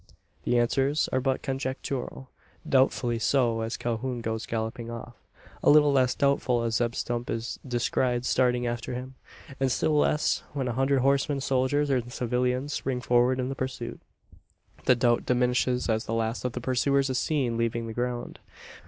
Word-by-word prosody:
The 120 - +2
answers 135 +5 +2
are 130 - +2
but 135 0 -1
conjectural; 130 -1 -4 0.4
doubtfully 125 -3 +2
so, 115 -2 +2
as 110 +1 -3
Calhoun 120 +1 -3
goes 110 -1 -3
galloping 115 +1 -3
off; 120 +1 -7 0.5
a - - +4
little 150 -1 +6
less 130 -2 +3
doubtful 130 -4 +1
as 115 -1 0
Zeb 120 -1 0
Stump 120 0 -3
is 115 +1 -3
descried 120 0 0
starting 125 -1 +2
after 120 +1 -3
him; 130 +1 -6 0.5
and 135 -1 +1
still 155 +4 +1
less, 150 0 +2
when 135 -3 -2
a 120 - -1
hundred 135 +2 +2
horsemen 140 +1 +2
soldiers 135 +2 +1
and 120 -2 0
civilians 125 +3 -1
spring 130 -2 -2
forward 125 +1 +2
in 130 0 -1
the - - -2
pursuit. 130 -3 -5 0.9
The 125 - +5
doubt 120 -1 +1
diminishes 125 0 +1
as 110 -1 0
the 115 - -2
last 115 +2 -2
of 125 - -1
the 125 - -4
pursuers 135 +2 +1
is 130 - 0
seen 135 -7 0
leaving 115 0 -1
the 115 - -6
ground. 120 0 -3
125 Hz, 170 wpm, -27 LUFS, 120-135 Hz, 0.9 s, little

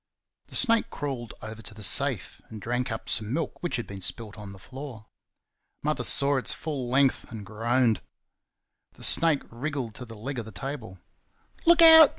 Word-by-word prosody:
The - - -10
snake 230 -3 +3
crawled 130 -5 -5
over 110 +1 -7
to 110 0 -9
the 110 - -8
safe - - 0
and 110 - -8
drank 125 +3 -2
up 110 - -5
some 110 0 -1
milk 160 +5 -3
which 175 - -2
had 120 - -3
been 100 -1 -9
spilt 100 +4 -3
on 105 -2 -9
the 100 - -11
floor. 130 +1 -9 0.8
Mother - - 0
saw 140 0 +5
its 130 - 0
full 140 -6 -4
length 135 +1 +3
and 110 -3 -7
groaned. 115 +2 +1 0.9
The - - -11
snake 165 -4 +5
wriggled 130 -1 -4
to 125 - -8
the 115 -2 -11
leg 130 +4 -4
of 115 - -5
the 110 - -9
table. 110 -2 -6 0.7
"Look 340 0 +7
out!" 320 -2 +10
120 Hz, 180 wpm, -27 LUFS, 110-140 Hz, 0.9 s, out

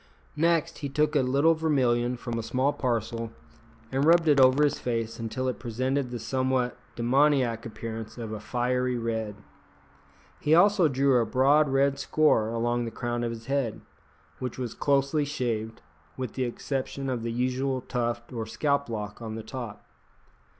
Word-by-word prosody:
Next, 165 +1 +1
he 140 - -4
took 150 +2 +1
a - - +5
little 140 +6 +3
vermilion 125 -6 +1
from 120 -1 -4
a - - -1
small 130 +5 0
parcel 115 -2 -2 0.6
and 135 +1 +1
rubbed 165 +1 +5
it 145 -2 +5
over 130 +3 +6
his 145 - +1
face 115 -2 -2
until 120 +3 -3
it 125 -5 -2
presented 130 +3 -1
the 120 - -4
somewhat 130 +1 0 0.2
demoniac 125 -2 +2
appearance 115 0 -7
of 115 -2 -5
a 110 - -4
fiery 125 +2 0
red. 110 -3 -2 1.0
He 155 +2 +3
also 195 0 +5
drew 135 -1 +3
a 115 - +2
broad 140 +5 +4
red 140 +1 +2
score 140 -8 +3
along 120 +1 0
the - - -3
crown 120 +1 -3
of 120 - -1
his 115 -1 -7
head, 135 -4 -1 0.6
which 125 -2 -4
was 125 -3 -4
closely 140 +1 +1
shaved, 115 - -3 0.3
with 130 -4 -4
the 130 - -1
exception 135 +2 -3
of 125 -3 -2
the 115 0 -3
usual 130 +2 -1
tuft 120 -1 -3
or 115 -2 -4
scalplock 115 -6 -2
on 110 -1 -5
the 110 - -6
top. 120 -2 -7
125 Hz, 165 wpm, -27 LUFS, 115-140 Hz, 1.0 s, over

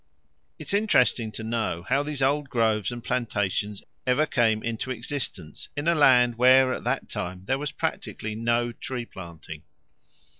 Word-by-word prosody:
It - - -9
is - - -1
interesting 125 - +3
to 110 - -6
know 110 -7 -2
how 135 +9 +1
these 145 -2 -3
old 140 +1 +1
groves 110 -5 +1
and 120 -1 -7
plantations 105 -4 -1 0.2
ever 130 +5 +3
came 115 -7 +1
into 115 +2 -3
existence 120 - -5
in 145 +3 -2
a 170 - +5
land 125 -6 +5
where 130 +1 +6
at - - -5
that - - -1
time 90 +1 -5
there 130 +5 0
was 150 0 -3
practically 110 0 -4
no 120 +2 0
tree 120 +1 -5
planting. 85 -6 -10
120 Hz, 160 wpm, -26 LUFS, 105-130 Hz, 0.2 s, where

